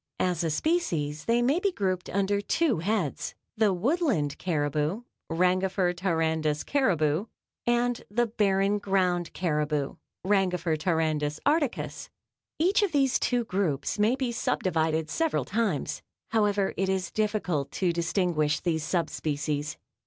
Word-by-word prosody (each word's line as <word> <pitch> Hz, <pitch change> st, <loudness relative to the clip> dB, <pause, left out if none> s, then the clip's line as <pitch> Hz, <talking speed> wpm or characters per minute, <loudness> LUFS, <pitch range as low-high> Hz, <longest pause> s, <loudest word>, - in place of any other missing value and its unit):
As 180 Hz, -2 st, +1 dB
a 165 Hz, -, +1 dB
species 155 Hz, -, -1 dB
they 235 Hz, +1 st, +2 dB
may 280 Hz, +7 st, +3 dB
be 395 Hz, +1 st, +1 dB
grouped 185 Hz, -, -2 dB
under 200 Hz, +1 st, +1 dB
two 270 Hz, -, +1 dB
heads 185 Hz, -4 st, -1 dB, 0.2 s
the 215 Hz, -2 st, +3 dB
Woodland 200 Hz, -, +1 dB
caribou 155 Hz, -, -1 dB, 0.3 s
(Rangifer 180 Hz, +2 st, +2 dB
tarandus 160 Hz, -4 st, 0 dB
caribou) 180 Hz, -, +1 dB, 0.4 s
and 240 Hz, 0 st, +1 dB
the 240 Hz, +4 st, +2 dB
barren 205 Hz, -2 st, +1 dB
ground 185 Hz, -3 st, +1 dB
caribou 150 Hz, -4 st, -1 dB, 0.3 s
(Rangifer 180 Hz, -4 st, +2 dB
tarandus 155 Hz, -2 st, 0 dB
articus). 290 Hz, -3 st, 0 dB, 0.5 s
Each 375 Hz, +6 st, +3 dB
of 400 Hz, -5 st, 0 dB
these 270 Hz, -3 st, +3 dB
two 245 Hz, -1 st, +1 dB
groups 185 Hz, -6 st, -1 dB
may 215 Hz, +4 st, +4 dB
be 260 Hz, -2 st, -2 dB
sub 235 Hz, -, -1 dB
divided 160 Hz, -3 st, +1 dB
several 325 Hz, -1 st, 0 dB
times. 200 Hz, -, -1 dB, 0.3 s
However, 205 Hz, -3 st, +1 dB
it 190 Hz, 0 st, 0 dB
is 190 Hz, -2 st, -1 dB
difficult 205 Hz, -9 st, -1 dB
to 180 Hz, -3 st, +1 dB
distinguish 170 Hz, -3 st, +1 dB
these 160 Hz, -3 st, -1 dB
sub 165 Hz, 0 st, 0 dB
species. 150 Hz, 0 st, -3 dB
185 Hz, 130 wpm, -27 LUFS, 160-220 Hz, 0.5 s, may